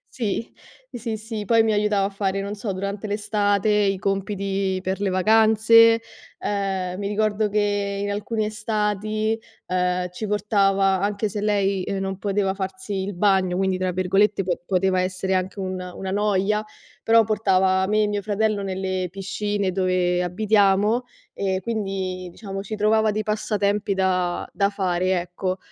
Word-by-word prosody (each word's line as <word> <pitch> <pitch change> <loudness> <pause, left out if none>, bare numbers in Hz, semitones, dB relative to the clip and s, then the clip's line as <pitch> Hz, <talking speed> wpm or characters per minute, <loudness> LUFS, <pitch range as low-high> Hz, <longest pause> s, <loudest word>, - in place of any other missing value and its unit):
sì, 225 -1 -2 0.4
sì, 230 -2 -4
sì 220 -1 -5
poi 230 +2 +4
mi 220 -1 +2
aiutava 205 -1 +2
a - - -1
fare, 195 -1 -2
non 200 +1 -4
so, 200 0 -4
durante 200 +2 -4
l'estate 205 0 0
i 205 -2 +2
compiti 195 -1 -1
per 190 +2 -3
le 200 - +1
vacanze, 220 +3 +5 0.4
ehm, 190 -3 -2
mi 200 - -2
ricordo 210 0 +1
che 205 -1 0
in 205 - -2
alcune 210 +1 -2
estati, 215 0 -1 0.3
ehm, 180 0 0
ci 215 - -5
portava 195 -2 +2
anche 205 +1 0
se 205 +1 -4
lei, 200 -2 +1
uhm, 195 - -2
non 195 -1 -3
poteva 195 -1 0
farsi 190 +1 -5
il 200 +1 -4
bagno, 185 -1 +2
quindi 190 -1 +1
tra 185 0 -1
virgolette 195 +2 +2
po 180 -1 -1
poteva 185 0 +1
essere 190 +1 -2
anche 185 +2 -1
una 185 -1 -4
una 190 0 -5
"noia", 205 +1 +1 0.4
però 225 0 +5
portava 190 -3 +2
me 215 +1 +2
e 210 - +1
mio 205 -1 -1
fratello 215 0 0
nelle 185 -1 -2
piscine 200 0 -2
dove 180 -1 +1
abitiamo. 205 +4 +2 0.3
E 190 -1 -1
quindi, 195 -5 -3
diciamo, 195 0 -6
ci 215 +1 -5
trovava 215 +1 +3
dei 215 +1 -2
passatempi 205 -1 0
da 185 -2 0
da 200 -1 +2
fare, 185 -2 0
ecco, 185 +2 -3
200 Hz, 155 wpm, -23 LUFS, 190-210 Hz, 0.4 s, vacanze